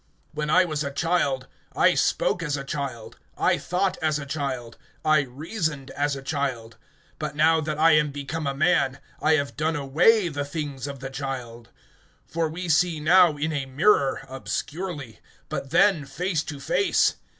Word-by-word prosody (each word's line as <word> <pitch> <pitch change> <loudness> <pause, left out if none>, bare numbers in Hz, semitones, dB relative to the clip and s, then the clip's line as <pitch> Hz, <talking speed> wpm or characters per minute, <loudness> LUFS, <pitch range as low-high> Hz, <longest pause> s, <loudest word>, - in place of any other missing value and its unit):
(11)When 150 0 -2
I 185 +4 +5
was 155 -3 -2
a 140 - -2
child, 140 -3 0 0.3
I - - +5
spoke 150 +5 +1
as 150 -3 -1
a 135 - -5
child, 135 -5 -5 0.2
I - - +2
thought 185 +1 -1
as 155 -1 +1
a 145 - -6
child, 135 -5 -4 0.3
I 155 -1 +5
reasoned 145 - -3
as 145 +1 -1
a 135 - -8
child; 130 -6 -3 0.4
but 140 - -4
now 160 +1 +4
that 155 0 -3
I 165 +2 +5
am 150 -1 +4
become 145 +2 -4
a 140 - -1
man, 140 -3 +2 0.2
I 155 +1 +4
have 140 -2 -2
done 160 +1 0
away 165 +9 +3
the 145 -3 -3
things 145 -2 -5
of 140 -2 -7
the 135 0 -6
child. 125 -4 -6 0.6
(12)For 165 -1 0
we 180 +2 -5
see 165 0 +2
now 170 0 +5
in 155 +2 -1
a 140 -2 -2
mirror, 140 -1 +2
obscurely; 145 - -5 0.3
but 135 - -4
then 170 -2 +3
face 160 +4 -1
to 145 -2 -6
face. 390 - +2
145 Hz, 170 wpm, -25 LUFS, 135-160 Hz, 0.6 s, I